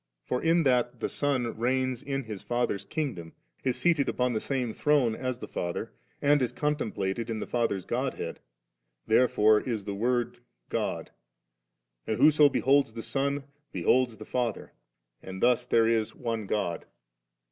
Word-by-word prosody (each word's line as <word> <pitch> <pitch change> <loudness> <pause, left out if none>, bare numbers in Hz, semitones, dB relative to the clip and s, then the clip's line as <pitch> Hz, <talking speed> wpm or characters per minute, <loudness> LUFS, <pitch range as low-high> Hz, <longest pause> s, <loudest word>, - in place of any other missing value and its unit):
For 125 - -1
in 165 +1 +3
that 125 -3 +1
the - - -1
Son 130 -5 -1
reigns 130 +1 0
in 135 -1 -3
His 110 -4 -7
Father's 120 -4 -1
kingdom, 125 - -4 0.3
is 130 -2 +1
seated 165 -5 +2
upon 125 -1 0
the 110 - 0
same 125 -4 -2
throne 145 -6 +2
as 130 0 -3
the - - -8
Father, 85 0 -4 0.3
and 145 0 +4
is 125 - 0
contemplated 115 -7 -2
in 110 -1 -2
the - - -3
Father's 115 -6 -1
Godhead, - - -3 0.7
therefore 110 -2 +4
b 120 0 -2
the 100 -1 -5
Word 120 +3 0 0.3
God, - - -2 1.0
and 110 - 0
whoso 150 +1 +6
beholds 135 -3 +2
the 115 - -6
Son, 140 +1 -1 0.3
beholds 120 +6 +2
the 110 - -9
Father; 120 -4 -2 0.5
and 95 0 -8
thus 125 +2 +3
there 115 -2 +4
is 115 -2 +1
one 115 -4 -3
God. 90 -6 -2
120 Hz, 155 wpm, -28 LUFS, 110-135 Hz, 1.0 s, whoso